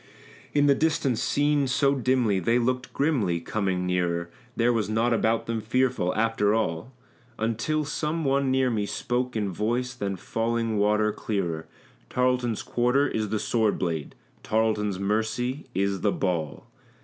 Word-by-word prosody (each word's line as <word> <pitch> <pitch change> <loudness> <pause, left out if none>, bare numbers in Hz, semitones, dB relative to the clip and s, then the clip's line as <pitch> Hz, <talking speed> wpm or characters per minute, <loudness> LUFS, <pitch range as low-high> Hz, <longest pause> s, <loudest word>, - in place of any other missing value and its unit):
In 145 0 +4
the 140 - +6
distance 135 -5 +1
seen 145 0 +2
so 140 +2 +2
dimly, 125 -6 +1
they 115 +7 +2
looked 125 +1 -1
grimly; 120 - +1
coming 95 0 -1
nearer, 85 -1 -1 0.2
There 120 +1 +3
was 110 -4 0
naught 115 +2 +2
about 115 0 +1
them 115 -1 -2
fearful, 115 -5 0
after 110 -2 +2
all, 110 +1 -2 0.5
Until 115 +8 -1
some 155 +2 -2
one 135 0 +2
near 130 -1 +2
me 105 -3 -1
spoke 125 +2 -2
in 105 -3 -1
voice 120 +7 -1
than 100 -6 -3
falling 115 +3 -1
water 105 +1 +3
clearer, 85 -8 -3 0.4
"Tarleton's 125 -3 0
quarter 125 +4 +2
is 110 -1 -2
the 110 - 0
sword 110 0 +1
blade, 80 -5 -3 0.3
Tarleton's 105 -3 0
mercy 110 +7 -1
is 100 0 0
the 105 - +2
ball." 85 -7 -2
115 Hz, 150 wpm, -26 LUFS, 100-125 Hz, 0.5 s, the